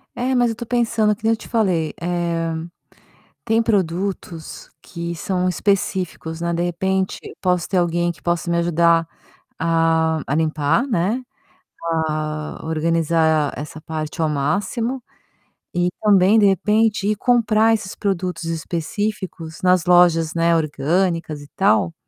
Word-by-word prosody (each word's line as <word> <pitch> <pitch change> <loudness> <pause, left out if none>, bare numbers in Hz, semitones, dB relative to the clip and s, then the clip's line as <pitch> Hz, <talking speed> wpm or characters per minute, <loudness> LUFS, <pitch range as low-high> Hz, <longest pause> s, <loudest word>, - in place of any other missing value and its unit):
É, 255 +2 -1
mas 245 -2 +3
eu 225 - -3
tô 235 +1 -7
pensando, 230 -3 +1
que 220 - -26
nem 225 +1 +3
eu - - -2
te - - -12
falei, 185 -9 0
eh, 170 -1 -1 0.9
tem 225 -1 +2
produtos 185 -5 -2
que 170 -1 -6
são 180 +2 -1
específicos, 180 -3 -1
né, 170 0 -1
de 170 +1 0
repente 190 +2 -1
eu - - -10
posso 180 -3 +1
ter 190 - 0
alguém 175 0 +1
que 170 - -16
possa 175 0 -1
me 170 - +1
ajudar 170 -1 +3 0.5
a 165 -1 +2
a 140 - -1
limpar, 155 - +1
né, 220 +3 0 0.9
a 155 0 -4
organizar 160 -1 +1
essa 150 +1 -7
parte 155 +1 -5
ao 160 - +2
máximo. 200 - -1 0.7
E 175 0 +2
também, 205 0 +5
de 210 - +5
repente, 210 +2 +2
ir 210 - +2
comprar 225 -1 +3
esses 200 -3 -3
produtos 185 -3 -2
específicos 165 +1 -4
nas 180 -1 +3
lojas, 175 -3 +4
né, 170 0 +3
orgânicas, 160 +1 0
e 145 - -12
tal 105 -6 +3
175 Hz, 140 wpm, -21 LUFS, 160-205 Hz, 0.9 s, também